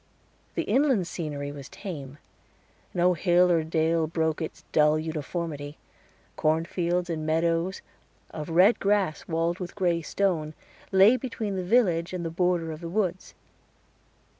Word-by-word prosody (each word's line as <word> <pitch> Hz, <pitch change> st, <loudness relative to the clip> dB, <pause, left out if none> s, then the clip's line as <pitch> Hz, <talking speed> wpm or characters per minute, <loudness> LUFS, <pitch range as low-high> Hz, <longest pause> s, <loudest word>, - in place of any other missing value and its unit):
The -, -, 0 dB
inland 265 Hz, -9 st, +2 dB
scenery 145 Hz, -4 st, -4 dB
was 140 Hz, -2 st, -9 dB
tame; 145 Hz, -8 st, -7 dB, 0.7 s
no 180 Hz, +1 st, +3 dB
hill 175 Hz, +1 st, +3 dB
or 165 Hz, -2 st, +3 dB
dale 160 Hz, 0 st, +1 dB
broke 160 Hz, -1 st, -1 dB
its 160 Hz, -, -6 dB
dull 150 Hz, 0 st, +4 dB
uniformity. 155 Hz, -1 st, -4 dB, 0.6 s
Cornfields 170 Hz, +3 st, 0 dB
and 160 Hz, -3 st, -3 dB
meadows 165 Hz, +3 st, 0 dB, 0.5 s
of 155 Hz, +1 st, -6 dB
red 185 Hz, +7 st, +5 dB
grass 195 Hz, -6 st, 0 dB
walled 165 Hz, +2 st, -1 dB
with 180 Hz, -2 st, -6 dB
gray 175 Hz, -4 st, +1 dB
stone, 160 Hz, -3 st, -1 dB, 0.4 s
lay 195 Hz, +6 st, +6 dB
between 225 Hz, -6 st, -4 dB
the 185 Hz, -, -2 dB
village 180 Hz, -5 st, +2 dB
and 175 Hz, -2 st, -3 dB
the 165 Hz, -, -3 dB
border 175 Hz, -1 st, 0 dB
of 155 Hz, +1 st, -8 dB
the 170 Hz, -, -5 dB
woods. 185 Hz, -1 st, -2 dB
170 Hz, 140 wpm, -27 LUFS, 160-185 Hz, 0.7 s, lay